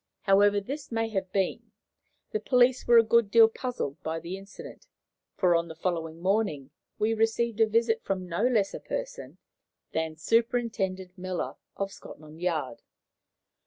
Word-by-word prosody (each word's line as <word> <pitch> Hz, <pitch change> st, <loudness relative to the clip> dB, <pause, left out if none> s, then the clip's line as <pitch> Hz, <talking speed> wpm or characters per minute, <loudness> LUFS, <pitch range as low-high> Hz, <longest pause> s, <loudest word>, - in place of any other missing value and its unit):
However 205 Hz, +1 st, +4 dB
this 270 Hz, +8 st, -7 dB
may 225 Hz, 0 st, -1 dB
have 190 Hz, -3 st, -3 dB
been, 195 Hz, -2 st, -1 dB, 0.6 s
the 435 Hz, -, -1 dB
police 250 Hz, -4 st, +3 dB
were 240 Hz, 0 st, +7 dB
a 230 Hz, -, +8 dB
good 230 Hz, -1 st, +3 dB
deal 225 Hz, +1 st, +7 dB
puzzled 225 Hz, -, -4 dB
by 160 Hz, +1 st, -3 dB
the 170 Hz, +3 st, -6 dB
incident, 195 Hz, +1 st, -11 dB, 0.5 s
for, 180 Hz, -2 st, +3 dB
on 170 Hz, 0 st, +1 dB
the 160 Hz, -, -9 dB
following 165 Hz, -1 st, -3 dB
morning, 180 Hz, -8 st, 0 dB, 0.3 s
we 215 Hz, +1 st, +1 dB
received 225 Hz, 0 st, 0 dB
a 220 Hz, -, +6 dB
visit 225 Hz, +1 st, +1 dB
from 185 Hz, -2 st, -3 dB
no 170 Hz, +2 st, -2 dB
less 215 Hz, -6 st, +1 dB
a -, -, -5 dB
person -, -, -6 dB, 0.5 s
than 160 Hz, 0 st, -2 dB
Superintendent 200 Hz, -2 st, 0 dB
Miller, 180 Hz, -8 st, -3 dB, 0.2 s
of 195 Hz, 0 st, -3 dB
Scotland 155 Hz, +2 st, -12 dB
Yard. 155 Hz, -9 st, -2 dB
195 Hz, 155 wpm, -28 LUFS, 170-230 Hz, 0.6 s, a